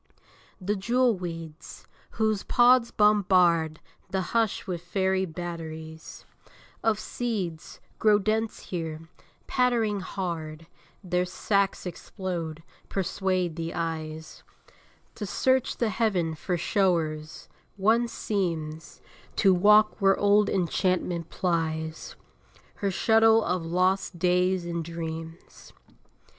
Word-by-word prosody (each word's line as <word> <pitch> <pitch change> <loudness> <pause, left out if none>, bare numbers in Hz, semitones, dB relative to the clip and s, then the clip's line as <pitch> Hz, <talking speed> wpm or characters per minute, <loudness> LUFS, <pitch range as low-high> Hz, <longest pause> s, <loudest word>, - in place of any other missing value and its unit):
The 200 +2 -1
jewel 235 +4 +2
weeds, 165 -3 -8 0.3
whose 215 -2 +1
pods 245 -1 +4
bombard 180 -6 +3 0.3
The 190 0 -1
hush 225 -3 +1
with 175 -3 -4
fairy 190 +1 0
batteries 160 -2 -7 0.6
Of 220 -2 +2
seeds, 200 -10 -4 0.2
grow 210 -1 +5
dense 215 +2 -1
here; 165 -2 -5 0.4
pattering 235 -5 +1
hard 165 -4 -5 0.4
Their 180 0 0
sacs 200 +1 0
explode, 170 -3 -5 0.3
persuade 185 -2 -1
the 165 0 -4
eyes 160 -2 -5 0.7
To 210 - -6
search 260 +5 +1
the 235 - +1
heaven 190 -6 0
for 175 +3 -2
show'rs: 165 -5 0 0.3
One 225 +4 +3
seems 165 -8 -3 0.3
To 195 -3 +4
walk 210 +4 +5
where 195 0 +4
old 205 0 +4
Enchantment 180 -2 0
plies 160 -3 -2 0.6
Her 200 - -1
shuttle 225 +3 +4
of 180 0 -1
lost 185 +2 0
days 180 +1 +2
and 170 -1 -3
dreams. 165 0 -8
185 Hz, 100 wpm, -27 LUFS, 165-210 Hz, 0.7 s, grow